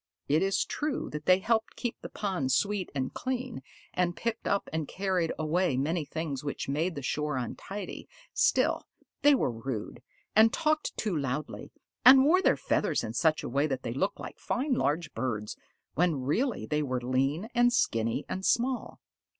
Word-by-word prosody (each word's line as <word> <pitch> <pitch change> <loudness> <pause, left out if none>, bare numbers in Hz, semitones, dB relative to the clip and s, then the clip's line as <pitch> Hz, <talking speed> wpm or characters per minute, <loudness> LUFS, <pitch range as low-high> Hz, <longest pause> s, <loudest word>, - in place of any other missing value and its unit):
It 150 +3 +3
is 195 0 +1
true 300 -2 -3
that 150 0 -6
they 185 0 +7
helped 220 +3 0
keep 240 -2 -4
the - - -7
pond 185 -11 -2
sweet 200 +6 +1
and 130 -1 -2
clean, 255 - -3 0.3
and 175 -1 0
picked 230 -1 -3
up 200 - +1
and 160 -2 -1
carried 185 -3 0
away 160 -2 +1
many 155 +4 0
things 150 -3 -4
which 145 - -4
made 160 +6 -1
the 140 - -5
shore 150 +1 -1
untidy, 190 - -6 0.2
still, - - +2 0.3
they 290 0 +6
were 130 - +1
rude, 115 -1 -5 0.3
and 220 +1 +7
talked 310 0 0
too 210 -6 -1
loudly, 140 0 -3 0.3
and 265 +1 +9
wore 360 +5 +5
their - - +3
feathers - - 0
in - - -4
such 160 0 +2
a - - -3
way 140 +4 +1
that 135 -3 -3
they 115 - -3
looked 190 +10 -1
like - - -8
fine 265 +3 -1
large 155 - 0
birds, 105 -5 -3 0.4
when 160 -5 +1
really 230 - 0
they 150 0 0
were 130 -3 -1
lean 135 - 0
and 245 0 +4
skinny 115 - +1
and 190 - -4
small. 250 +5 0
165 Hz, 175 wpm, -29 LUFS, 140-220 Hz, 0.4 s, and